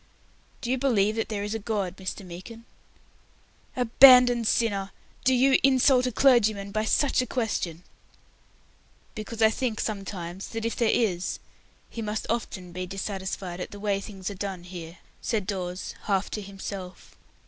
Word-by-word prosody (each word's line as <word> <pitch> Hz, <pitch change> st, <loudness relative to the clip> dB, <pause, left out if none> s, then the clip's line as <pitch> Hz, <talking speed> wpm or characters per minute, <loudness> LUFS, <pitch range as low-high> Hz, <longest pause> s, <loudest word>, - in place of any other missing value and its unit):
"Do 240 Hz, -, -2 dB
you 260 Hz, -, +1 dB
believe 220 Hz, -6 st, +2 dB
that 225 Hz, -, -2 dB
there 205 Hz, -2 st, -2 dB
is 210 Hz, +1 st, -3 dB
a 225 Hz, -, -2 dB
God, 200 Hz, -4 st, -2 dB
Mr. 190 Hz, +1 st, -6 dB
Meekin?" 185 Hz, +7 st, -10 dB, 1.1 s
"Abandoned 250 Hz, -1 st, +7 dB
sinner! 200 Hz, -5 st, +1 dB, 0.3 s
Do 260 Hz, -, +4 dB
you 260 Hz, +1 st, +4 dB
insult 260 Hz, -1 st, +4 dB
a -, -, -1 dB
clergyman 215 Hz, -6 st, +3 dB
by 215 Hz, +1 st, -1 dB
such 275 Hz, +4 st, +2 dB
a 250 Hz, -, -3 dB
question?" 185 Hz, -8 st, -2 dB, 1.3 s
"Because 220 Hz, +1 st, -3 dB
I 220 Hz, -, +6 dB
think 230 Hz, -2 st, -2 dB
sometimes 195 Hz, -3 st, -4 dB
that 225 Hz, 0 st, -5 dB
if 230 Hz, -, -1 dB
there 230 Hz, -2 st, +2 dB
is, 185 Hz, -7 st, 0 dB, 0.5 s
He 230 Hz, -, -7 dB
must 215 Hz, 0 st, -3 dB
often 190 Hz, -6 st, -4 dB
be 185 Hz, +1 st, -5 dB
dissatisfied 190 Hz, -2 st, -4 dB
at -, -, -5 dB
the 205 Hz, -, -10 dB
way 200 Hz, -1 st, 0 dB
things 195 Hz, -1 st, -6 dB
are -, -, -5 dB
done 195 Hz, -2 st, -5 dB
here," 175 Hz, -1 st, -9 dB, 0.2 s
said 215 Hz, -5 st, -1 dB
Dawes, 185 Hz, -2 st, -4 dB
half 195 Hz, -2 st, 0 dB
to 210 Hz, -, -3 dB
himself. 195 Hz, -2 st, -8 dB
210 Hz, 160 wpm, -26 LUFS, 190-230 Hz, 1.3 s, Abandoned